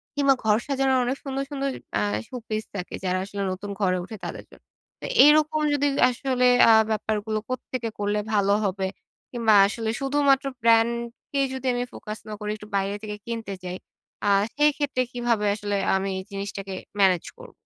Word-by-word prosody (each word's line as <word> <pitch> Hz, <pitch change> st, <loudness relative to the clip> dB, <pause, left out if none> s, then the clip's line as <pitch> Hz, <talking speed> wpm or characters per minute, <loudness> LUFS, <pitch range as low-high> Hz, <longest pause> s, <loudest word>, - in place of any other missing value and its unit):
কিংবা 280 Hz, -1 st, +4 dB
ঘর 215 Hz, -1 st, +4 dB
সাজানোর 270 Hz, -1 st, +2 dB
অনেক 255 Hz, +3 st, -1 dB
সুন্দর, 275 Hz, -1 st, -3 dB
সুন্দর 275 Hz, -1 st, -1 dB, 0.3 s
আ -, -, 0 dB, 0.3 s
শো -, -, -10 dB
পিস 215 Hz, 0 st, -2 dB
থাকে 180 Hz, -2 st, -5 dB
যারা 185 Hz, 0 st, 0 dB
আসলে 200 Hz, 0 st, -5 dB
নতুন 195 Hz, +2 st, -6 dB
ঘরে 185 Hz, -3 st, +2 dB
উঠে 215 Hz, +4 st, -8 dB
তাদের -, -, -6 dB
জন্য। -, -, -18 dB, 0.4 s
তো -, -, -6 dB, 0.2 s
এরকম 310 Hz, +1 st, +4 dB
যদি 290 Hz, 0 st, +1 dB, 0.2 s
আসলে 250 Hz, 0 st, 0 dB, 0.2 s
আ -, -, +9 dB, 0.2 s
ব্যাপারগুলো 215 Hz, 0 st, -1 dB
কোত্থেকে 255 Hz, -2 st, -3 dB
করলে 205 Hz, 0 st, 0 dB
ভালো 200 Hz, -1 st, +3 dB
হবে? 190 Hz, 0 st, -1 dB, 0.4 s
কিংবা 230 Hz, -3 st, +2 dB
আসলে 220 Hz, +1 st, -3 dB
শুধুমাত্র 275 Hz, 0 st, +2 dB, 0.2 s
ব্র্যান্ডকে 235 Hz, +4 st, +1 dB
যদি 265 Hz, 0 st, -6 dB
আমি 245 Hz, 0 st, -1 dB
ফোকাস 215 Hz, 0 st, -7 dB
না 215 Hz, -, -6 dB
করি 210 Hz, -1 st, -3 dB
একটু 210 Hz, -, -12 dB
বাইরে 195 Hz, +1 st, 0 dB
থেকে 210 Hz, -1 st, -5 dB
কিনতে 230 Hz, -3 st, -4 dB
চাই, 180 Hz, 0 st, -5 dB, 0.5 s
আ -, -, +1 dB, 0.3 s
সেইক্ষেত্রে 290 Hz, -2 st, +2 dB
কীভাবে 240 Hz, -3 st, 0 dB
আসলে 205 Hz, -1 st, -3 dB, 0.2 s
আমি 190 Hz, +1 st, -1 dB
এই -, -, -6 dB
জিনিসটাকে 195 Hz, 0 st, -5 dB, 0.3 s
ম্যানেজ 185 Hz, -4 st, +4 dB
করবো? -, -, -12 dB
225 Hz, 170 wpm, -25 LUFS, 200-265 Hz, 0.5 s, আ